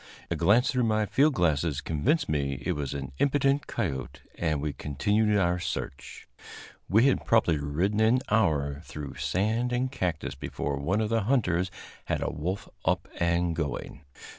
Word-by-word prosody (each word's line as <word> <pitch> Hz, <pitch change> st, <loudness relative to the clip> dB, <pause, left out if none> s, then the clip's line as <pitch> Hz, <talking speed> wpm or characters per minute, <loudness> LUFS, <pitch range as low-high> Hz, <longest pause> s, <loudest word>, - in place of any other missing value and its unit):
A -, -, +1 dB
glance 115 Hz, +5 st, +4 dB
through 125 Hz, -2 st, +1 dB
my 110 Hz, -1 st, +2 dB
field 140 Hz, +7 st, +3 dB
glasses 80 Hz, -3 st, +1 dB
convinced 140 Hz, -, 0 dB
me 70 Hz, -2 st, 0 dB
that 65 Hz, -, -5 dB
it -, -, +3 dB
was 70 Hz, -2 st, -3 dB
an 70 Hz, -2 st, -5 dB
impudent 140 Hz, 0 st, +2 dB
coyote, 70 Hz, -, -3 dB
and 80 Hz, -3 st, -1 dB
we 75 Hz, 0 st, -2 dB
continued 105 Hz, +9 st, +1 dB
our 90 Hz, -2 st, +2 dB
search. 65 Hz, -6 st, -5 dB, 0.6 s
We 110 Hz, +6 st, +5 dB
had 135 Hz, -, +2 dB
probably 90 Hz, -9 st, +3 dB
ridden 85 Hz, +9 st, 0 dB
an 115 Hz, +4 st, +4 dB
hour 75 Hz, -9 st, +1 dB
through 75 Hz, -4 st, -8 dB
sand 110 Hz, +6 st, 0 dB
and 125 Hz, +1 st, 0 dB
cactus 85 Hz, -4 st, -2 dB
before 70 Hz, +1 st, -4 dB
one 95 Hz, +10 st, 0 dB
of 110 Hz, -, -1 dB
the 115 Hz, -3 st, +1 dB
hunters 95 Hz, -8 st, +1 dB, 0.4 s
had -, -, -1 dB
a -, -, -1 dB
wolf 90 Hz, +5 st, -3 dB, 0.2 s
up -, -, 0 dB
and 85 Hz, 0 st, +1 dB
going. 75 Hz, -2 st, -4 dB
90 Hz, 165 wpm, -28 LUFS, 75-110 Hz, 0.6 s, We